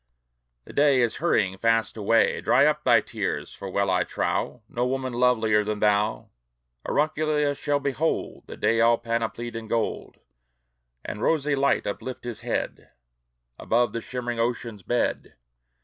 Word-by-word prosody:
The - - -12
day 140 -2 +4
is 120 -2 +1
hurrying 100 - +1
fast 115 -1 +1
away!" 115 +1 +2
Dry - - +4
up - - +1
thy - - +5
tears! - - -4
For 95 - -7
well 100 0 0
I 90 -1 +2
trow, 115 +5 -2
No 120 - -2
woman 130 -1 -2
lovelier 115 -4 +3
than 105 0 -3
thou, 105 +1 +1 0.6
Aurunculeia, 150 -1 +1
shall 145 0 0
behold 140 +3 -2
The - - -9
day 115 0 +2
all 115 0 +5
panoplied 115 0 -3
in 115 -1 -6
gold, 115 0 -2 0.9
And 105 - -5
rosy 150 -1 +1
light 140 0 +1
uplift 125 +5 -5
his 120 -2 -6
head - - -3 0.7
Above 120 +1 +1
the 115 - -3
shimmering 120 -1 -4
ocean's 115 -2 -2
bed! 120 +5 -1
115 Hz, 150 wpm, -25 LUFS, 110-130 Hz, 0.9 s, thy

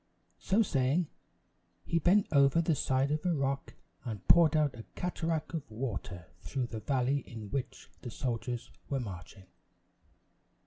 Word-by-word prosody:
So 210 +3 +3
saying, 145 0 +1 0.7
he 170 - +1
bent 190 +5 +4
over 140 +2 +5
the 165 0 +2
side 135 0 +1
of 150 0 0
a 175 -2 +2
rock 140 -1 -2 0.3
and 110 -6 -6
poured 165 -3 +6
out 150 -3 +3
a - - -4
cataract 165 -2 -2
of 160 -7 -4
water 110 -7 -4
through 130 +6 -2
the 110 - -2
valley 130 +4 +1
in 110 -5 -9
which 135 -2 -4
the 120 - -6
soldiers 120 0 -3 0.2
were 135 - 0
marching. 95 -3 -8
135 Hz, 145 wpm, -32 LUFS, 120-160 Hz, 0.7 s, poured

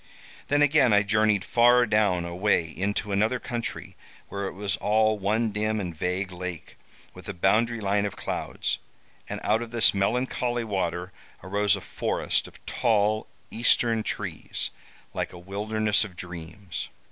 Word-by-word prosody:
Then 145 0 +4
again 145 -5 +5
I 105 0 +5
journeyed 105 -1 +2
far 120 +1 +5
down 105 -5 +2
away 90 0 +1
into 100 +6 -2
another 110 +5 +2
country 120 -1 -5 0.3
where 100 0 -3
it - - -6
was 100 +1 -1
all 110 0 +2
one 110 +3 +1
dim 110 +1 0
and 90 -4 -4
vague 90 +3 -2
lake, 90 -2 -6 0.4
with - - -10
a - - -4
boundary 115 +6 +2
line 100 0 +1
of 100 - -7
clouds. - - -3 0.5
And - - -3
out 110 +2 +2
of 120 - -5
this 115 -1 +4
melancholy 120 +3 0
water 90 -3 -2 0.3
arose 100 +1 +2
a 100 - -7
forest - - -1
of - - -17
tall 110 -2 +1 0.2
eastern 115 -1 +3
trees, - - -4 0.4
like - - -3
a - - -9
wilderness 105 +4 0
of 100 -4 -8
dreams. 85 +2 -7
105 Hz, 150 wpm, -26 LUFS, 95-110 Hz, 0.5 s, again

